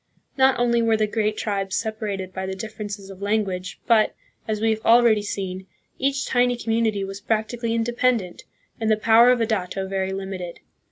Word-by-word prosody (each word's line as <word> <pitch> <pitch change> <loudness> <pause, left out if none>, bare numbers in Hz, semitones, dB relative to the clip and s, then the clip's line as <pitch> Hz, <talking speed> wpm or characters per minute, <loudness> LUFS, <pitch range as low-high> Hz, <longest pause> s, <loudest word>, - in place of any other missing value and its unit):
Not 265 -1 +4
only 235 -1 +2
were 225 -1 +3
the 215 - +2
great 215 0 -1
tribes 195 -3 -2
sep 220 -1 -2
arated 195 -3 -4
by 190 0 -4
the 190 - -4
differences 205 -1 -7
of 190 0 -12
language, 200 -3 -2
but, 220 -3 +3 0.3
as 215 -1 -1
we 225 +1 +2
have 220 0 -3
already 230 -2 +5
seen, 190 -2 -5 0.3
each 270 0 0
tiny 245 -1 +2
community 225 -3 0
was 195 +1 -6
practically 230 +2 -1
inde 230 +1 0
pendent, 235 -9 0 0.4
and 220 -1 0
the 215 - +4
power 225 +2 +6
of 250 -2 +3
a - - +3
dato 195 -3 -2
very 190 0 -2
limited. 190 -2 -5
215 Hz, 185 wpm, -23 LUFS, 195-230 Hz, 0.4 s, power